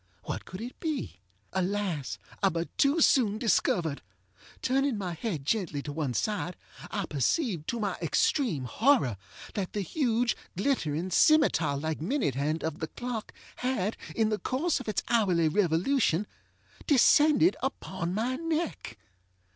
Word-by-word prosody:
What -, -, -5 dB
could 185 Hz, +2 st, -8 dB
it 245 Hz, +2 st, -7 dB
be? 310 Hz, -, -3 dB, 0.3 s
Alas! 190 Hz, -6 st, -1 dB, 0.2 s
I 195 Hz, -, +4 dB
but 170 Hz, -1 st, -4 dB
too 285 Hz, +4 st, +4 dB
soon 220 Hz, -8 st, +4 dB
discovered. 195 Hz, -, +1 dB, 0.6 s
Turning 270 Hz, -1 st, +1 dB
my 185 Hz, -4 st, -3 dB
head 165 Hz, -5 st, -4 dB
gently 160 Hz, -7 st, -1 dB
to 145 Hz, -, -5 dB
one 145 Hz, -5 st, -2 dB
side, 180 Hz, -, -1 dB, 0.3 s
I 200 Hz, -3 st, -2 dB
perceived, 165 Hz, -, 0 dB
to 235 Hz, -, -2 dB
my 200 Hz, -3 st, -1 dB
extreme 175 Hz, -, +1 dB
horror, 210 Hz, -, +2 dB, 0.4 s
that 195 Hz, -3 st, -3 dB
the 205 Hz, -, -1 dB
huge, 240 Hz, -, +1 dB, 0.2 s
glittering, 185 Hz, -, 0 dB
scimetar 180 Hz, -, +4 dB
like 155 Hz, 0 st, -3 dB
minute 210 Hz, -, 0 dB
hand 150 Hz, +5 st, -1 dB
of 160 Hz, +1 st, -3 dB
the 160 Hz, -, -3 dB
clock 240 Hz, +1 st, -5 dB, 0.3 s
had, 230 Hz, -5 st, -1 dB, 0.2 s
in 220 Hz, -1 st, +2 dB
the 215 Hz, -1 st, -1 dB
course 290 Hz, +6 st, 0 dB
of 255 Hz, -, -9 dB
its 210 Hz, -, -1 dB
hourly 190 Hz, -9 st, +3 dB
revolution, 180 Hz, -, +2 dB, 0.6 s
descended 300 Hz, +4 st, +5 dB
upon 190 Hz, -9 st, -3 dB
my 245 Hz, +4 st, 0 dB
neck. 325 Hz, -, -3 dB
205 Hz, 140 wpm, -29 LUFS, 165-255 Hz, 0.6 s, descended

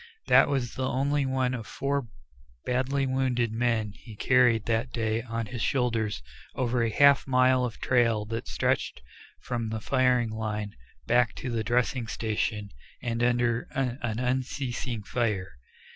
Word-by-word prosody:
That -, -, +6 dB
was 130 Hz, -3 st, -2 dB
only 135 Hz, +2 st, 0 dB
one 130 Hz, -1 st, 0 dB
of 115 Hz, -4 st, -5 dB
four 140 Hz, -2 st, -2 dB, 0.6 s
badly 130 Hz, +2 st, 0 dB
wounded 130 Hz, -3 st, 0 dB
men 115 Hz, -2 st, 0 dB
he 110 Hz, +1 st, -13 dB
carried 120 Hz, -2 st, +3 dB
that 115 Hz, +2 st, 0 dB
day 110 Hz, -1 st, -1 dB
on 115 Hz, -1 st, -4 dB
his 115 Hz, +2 st, -6 dB
shoulders 115 Hz, -, 0 dB, 0.3 s
over 125 Hz, -2 st, 0 dB
a 115 Hz, -, +2 dB
half 140 Hz, +5 st, +5 dB
mile 130 Hz, -1 st, +4 dB
of 115 Hz, -, -6 dB
trail 115 Hz, -4 st, +2 dB
that 115 Hz, +2 st, -5 dB
stretched -, -, -1 dB, 0.4 s
from 115 Hz, -2 st, -3 dB
the 110 Hz, 0 st, -3 dB
firing 125 Hz, -1 st, +2 dB
line 105 Hz, -2 st, -4 dB, 0.3 s
back 120 Hz, -1 st, +2 dB
to 130 Hz, -, -5 dB
the 115 Hz, -2 st, -1 dB
dressing 120 Hz, +1 st, 0 dB
station 105 Hz, -2 st, -2 dB, 0.3 s
and 120 Hz, -1 st, -2 dB
under 120 Hz, -1 st, +1 dB
an 120 Hz, -4 st, -2 dB
unceasing 125 Hz, -2 st, -2 dB
fire. 105 Hz, -5 st, -1 dB
120 Hz, 145 wpm, -27 LUFS, 110-130 Hz, 0.6 s, That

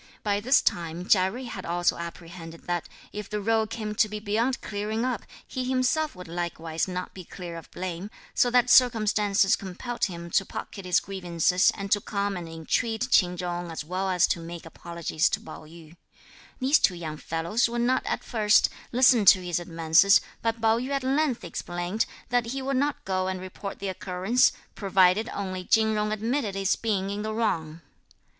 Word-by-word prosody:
By 205 Hz, -1 st, +1 dB
this 255 Hz, +6 st, +3 dB
time 170 Hz, +1 st, -1 dB
Chia 185 Hz, -2 st, +4 dB
Jui 250 Hz, +6 st, -7 dB
had 190 Hz, -5 st, -6 dB
also 175 Hz, +1 st, +1 dB
apprehended 170 Hz, -1 st, -9 dB
that 175 Hz, -1 st, -3 dB, 0.2 s
if 210 Hz, -1 st, -6 dB
the 210 Hz, -, -2 dB
row 220 Hz, +1 st, +1 dB
came 215 Hz, -1 st, -4 dB
to 215 Hz, 0 st, +2 dB
be 210 Hz, 0 st, -5 dB
beyond 225 Hz, +5 st, 0 dB
clearing 215 Hz, +3 st, -3 dB
up, 250 Hz, -4 st, -1 dB, 0.3 s
he 255 Hz, -, -3 dB
himself 260 Hz, +4 st, 0 dB
would 180 Hz, -1 st, -10 dB
likewise 165 Hz, -1 st, -3 dB
not 180 Hz, 0 st, -5 dB
be 185 Hz, -, -9 dB
clear 175 Hz, 0 st, -8 dB
of 165 Hz, -, -10 dB
blame, 185 Hz, +2 st, -5 dB, 0.2 s
so 245 Hz, -, +3 dB
that 245 Hz, 0 st, +3 dB
circumstances 210 Hz, -5 st, +4 dB
compelled 205 Hz, +6 st, -3 dB
him 170 Hz, -2 st, -7 dB
to 195 Hz, -, +3 dB
pocket 195 Hz, 0 st, -7 dB
his 180 Hz, -1 st, +3 dB
grievances 180 Hz, -2 st, +1 dB
and 200 Hz, 0 st, -6 dB
to 205 Hz, -, +4 dB
come 200 Hz, -1 st, -2 dB
and 175 Hz, -2 st, -6 dB
entreat 220 Hz, +9 st, -1 dB
Ch'in 180 Hz, -1 st, +4 dB
Chung 175 Hz, -1 st, -3 dB
as 160 Hz, -2 st, -5 dB
well 185 Hz, +3 st, -2 dB
as 180 Hz, -2 st, +4 dB
to -, -, -1 dB
make 170 Hz, 0 st, -8 dB
apologies 170 Hz, 0 st, -1 dB
to -, -, -1 dB
Pao -, -, -10 dB
yü. 165 Hz, 0 st, -14 dB, 0.6 s
These 270 Hz, +3 st, +4 dB
two 180 Hz, -, +3 dB
young 160 Hz, -3 st, -6 dB
fellows 170 Hz, +11 st, 0 dB
would 235 Hz, 0 st, -2 dB
not 250 Hz, +2 st, +2 dB
at -, -, -2 dB
first 215 Hz, -3 st, +3 dB, 0.2 s
listen 245 Hz, -2 st, +5 dB
to 185 Hz, -1 st, +7 dB
his 175 Hz, -1 st, 0 dB
advances, 165 Hz, +3 st, +4 dB, 0.2 s
but 230 Hz, 0 st, -1 dB
Pao 225 Hz, +1 st, +3 dB
yü 255 Hz, +2 st, -4 dB
at 275 Hz, -1 st, -1 dB
length 270 Hz, -2 st, +1 dB
explained 175 Hz, +4 st, -3 dB, 0.2 s
that 245 Hz, -1 st, +1 dB
he 265 Hz, +3 st, -4 dB
would 270 Hz, 0 st, 0 dB
not 285 Hz, +2 st, -1 dB
go 185 Hz, -1 st, 0 dB
and 190 Hz, 0 st, -3 dB
report 185 Hz, +2 st, -7 dB
the 195 Hz, -, -4 dB
occurrence, 190 Hz, +6 st, +2 dB, 0.2 s
provided 195 Hz, +2 st, +3 dB
only 185 Hz, -2 st, -4 dB
Chin 220 Hz, +3 st, +3 dB
Jung 210 Hz, 0 st, 0 dB
admitted 220 Hz, 0 st, -1 dB
his 195 Hz, 0 st, +1 dB
being 200 Hz, -3 st, -1 dB
in 205 Hz, +1 st, -3 dB
the 215 Hz, 0 st, -3 dB
wrong. 165 Hz, -8 st, -1 dB
195 Hz, 190 wpm, -26 LUFS, 175-225 Hz, 0.6 s, to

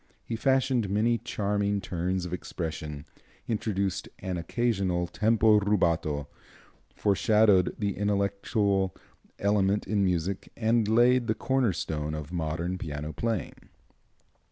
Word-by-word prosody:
He 115 Hz, -, -4 dB
fashioned 130 Hz, -3 st, +1 dB
many 115 Hz, +4 st, +2 dB
charming 100 Hz, 0 st, -1 dB
turns 90 Hz, -1 st, -2 dB
of 90 Hz, -, -6 dB
expression, 80 Hz, -4 st, -5 dB, 0.4 s
introduced 100 Hz, -4 st, -1 dB
an 95 Hz, -1 st, -4 dB
occasional 95 Hz, -1 st, 0 dB
tempo 110 Hz, +3 st, +3 dB
rubato, 85 Hz, -8 st, 0 dB, 0.7 s
foreshadowed 105 Hz, -2 st, +3 dB
the 100 Hz, -3 st, -1 dB
intellectual 100 Hz, -1 st, 0 dB, 0.4 s
element 100 Hz, 0 st, +1 dB
in 105 Hz, -2 st, +1 dB
music 90 Hz, +1 st, -1 dB
and 115 Hz, -1 st, +2 dB
laid 120 Hz, +2 st, +4 dB
the 110 Hz, -, +1 dB
corner 130 Hz, -5 st, +1 dB
stone 75 Hz, -3 st, -3 dB
of 75 Hz, +2 st, -7 dB
modern 85 Hz, +2 st, -2 dB
piano 75 Hz, -1 st, -5 dB
playing. 110 Hz, 0 st, -3 dB
100 Hz, 110 wpm, -28 LUFS, 85-110 Hz, 0.7 s, laid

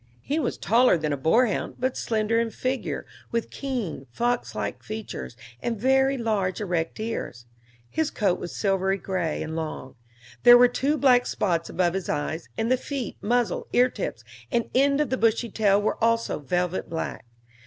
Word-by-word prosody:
He 300 Hz, +3 st, -1 dB
was 265 Hz, -, -1 dB
taller 235 Hz, -3 st, +4 dB
than 155 Hz, -2 st, -1 dB
a -, -, +1 dB
boarhound, 205 Hz, -, +1 dB
but 260 Hz, +1 st, -1 dB
slender 220 Hz, 0 st, 0 dB
in 230 Hz, 0 st, 0 dB
figure, 255 Hz, +3 st, -3 dB, 0.2 s
with 230 Hz, -1 st, -2 dB
keen, 240 Hz, -, -4 dB
fox 240 Hz, -, -1 dB
like -, -, -3 dB
features, 215 Hz, -, -6 dB, 0.2 s
and 230 Hz, -3 st, -2 dB
very 265 Hz, +3 st, +3 dB
large, 210 Hz, -6 st, -1 dB
erect 175 Hz, -5 st, -2 dB
ears; 215 Hz, -, -4 dB, 0.4 s
his 315 Hz, -, -1 dB
coat 195 Hz, -9 st, 0 dB
was 175 Hz, -, -6 dB
silvery 195 Hz, -1 st, +1 dB
gray, 180 Hz, -4 st, -2 dB
and 160 Hz, 0 st, -5 dB
long; 155 Hz, -5 st, -5 dB, 0.5 s
there 245 Hz, 0 st, +9 dB
were 245 Hz, 0 st, +7 dB
two 275 Hz, +5 st, 0 dB
black 250 Hz, -3 st, +4 dB
spots 170 Hz, -5 st, 0 dB
above 175 Hz, -2 st, +1 dB
his 190 Hz, -2 st, -3 dB
eyes; 160 Hz, +3 st, -2 dB
and 225 Hz, +2 st, 0 dB
the 255 Hz, -, +4 dB
feet, 260 Hz, -4 st, -4 dB
muzzle, 240 Hz, -2 st, 0 dB
ear 250 Hz, +1 st, +4 dB
tips, -, -, -5 dB, 0.3 s
and 235 Hz, -3 st, 0 dB
end 280 Hz, +2 st, +3 dB
of 295 Hz, -5 st, 0 dB
the 260 Hz, -, +1 dB
bushy 230 Hz, 0 st, +1 dB
tail 205 Hz, -2 st, +3 dB
were 210 Hz, +1 st, -1 dB
also 230 Hz, -4 st, +1 dB
velvet 180 Hz, +5 st, -1 dB
black. 165 Hz, -1 st, -4 dB
225 Hz, 175 wpm, -25 LUFS, 180-245 Hz, 0.5 s, there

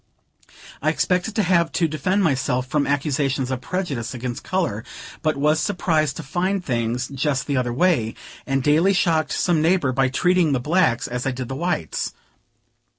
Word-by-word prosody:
I 155 Hz, -, +2 dB
expected 180 Hz, +6 st, 0 dB
to 215 Hz, -, +2 dB
have 170 Hz, -3 st, +2 dB
to 165 Hz, -, +2 dB
defend 180 Hz, +7 st, 0 dB
myself 130 Hz, -5 st, +1 dB
from 145 Hz, +2 st, 0 dB
accusations 140 Hz, -2 st, 0 dB
of 130 Hz, -1 st, -3 dB
prejudice 145 Hz, -, -3 dB
against 125 Hz, +2 st, -5 dB
color; 170 Hz, -, -1 dB, 0.4 s
but 155 Hz, -3 st, 0 dB
was 150 Hz, +2 st, +2 dB
surprised 160 Hz, -6 st, 0 dB
to 165 Hz, -, -6 dB
find 180 Hz, +6 st, -1 dB
things 120 Hz, 0 st, -1 dB
just 140 Hz, 0 st, -1 dB
the 140 Hz, -2 st, -1 dB
other 125 Hz, -1 st, 0 dB
way, 125 Hz, -5 st, +1 dB, 0.3 s
and 135 Hz, -1 st, 0 dB
daily 160 Hz, +7 st, +4 dB
shocked 160 Hz, -5 st, +1 dB
some 170 Hz, -4 st, +1 dB
neighbor 165 Hz, -4 st, +2 dB
by 130 Hz, +1 st, +2 dB
treating 180 Hz, +2 st, +2 dB
the 130 Hz, -, +1 dB
blacks 150 Hz, -3 st, +1 dB
as 125 Hz, +2 st, -3 dB
I -, -, +1 dB
did 130 Hz, -1 st, -5 dB
the 135 Hz, -, -4 dB
whites. 165 Hz, -, -2 dB
150 Hz, 170 wpm, -22 LUFS, 130-175 Hz, 0.4 s, daily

